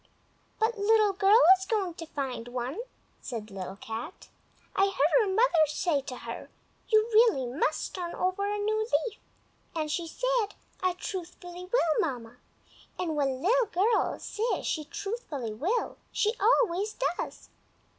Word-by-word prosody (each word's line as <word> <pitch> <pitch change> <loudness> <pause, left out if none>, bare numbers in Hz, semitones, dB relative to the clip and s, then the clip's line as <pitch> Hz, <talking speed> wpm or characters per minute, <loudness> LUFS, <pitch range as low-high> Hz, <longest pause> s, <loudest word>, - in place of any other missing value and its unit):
"But 445 0 0
Little 425 0 +4
Girl 400 +3 +5 0.2
is 380 - -6
going 390 -5 0
to 330 -1 -8
find 265 -6 -4
one," 250 - -4 0.4
said 220 -4 -6
Little 190 0 -6
Cat. 225 - -7 0.5
"I 390 - +5
heard 375 - +3
her 425 - +1
mother 380 -7 +4
say 300 0 0
to 265 -2 -7
her, - - -7 0.4
'You 435 0 +4
really 430 - +5
must 275 +5 -1
turn 350 -2 -4
over 385 +2 0
a 415 - -1
new 430 +1 0 0.3
leaf!' 440 -3 -6 0.6
and 310 -2 -1
she 335 +1 -2
said, - - 0 0.3
'I 370 -1 +2
truthfully 355 -1 -7
will, 335 -11 +3
Mamma!' 245 -6 -3 0.6
and 330 -4 -2
when 270 -2 0
Little 475 +5 +3
Girl 420 +5 +1
says 450 +3 -2
she 310 -3 -1
truthfully 325 - -5
will 355 - -1
she 430 +1 +1
always 420 -2 +2 0.2
does. - - -6
365 Hz, 145 wpm, -29 LUFS, 290-430 Hz, 0.6 s, Girl